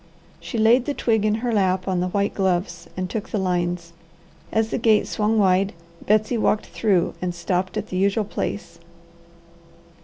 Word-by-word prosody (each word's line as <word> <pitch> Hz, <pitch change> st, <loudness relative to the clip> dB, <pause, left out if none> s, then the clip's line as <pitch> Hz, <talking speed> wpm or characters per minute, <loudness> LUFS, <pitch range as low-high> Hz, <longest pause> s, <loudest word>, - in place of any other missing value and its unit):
She 240 Hz, -, -6 dB
laid 235 Hz, +3 st, +4 dB
the 290 Hz, -, -2 dB
twig 220 Hz, -3 st, +1 dB
in 215 Hz, 0 st, +2 dB
her 240 Hz, -, 0 dB
lap 185 Hz, -2 st, +1 dB
on 185 Hz, -2 st, 0 dB
the 180 Hz, -, 0 dB
white 200 Hz, +2 st, 0 dB
gloves 185 Hz, -2 st, -1 dB
and 185 Hz, 0 st, -2 dB
took 215 Hz, +3 st, -5 dB
the 215 Hz, -, -2 dB
lines. 175 Hz, -2 st, -1 dB, 0.6 s
As 220 Hz, 0 st, 0 dB
the -, -, -1 dB
gate 220 Hz, -2 st, +4 dB
swung 215 Hz, +1 st, 0 dB
wide, 195 Hz, -1 st, +3 dB, 0.3 s
Betsy 215 Hz, +3 st, +2 dB
walked 215 Hz, -, +1 dB
through 195 Hz, -6 st, +1 dB
and 180 Hz, -1 st, -2 dB
stopped 185 Hz, +3 st, -2 dB
at 215 Hz, 0 st, -4 dB
the 185 Hz, -, -3 dB
usual 200 Hz, +3 st, +1 dB
place. 175 Hz, -4 st, -5 dB
200 Hz, 175 wpm, -23 LUFS, 185-215 Hz, 0.6 s, laid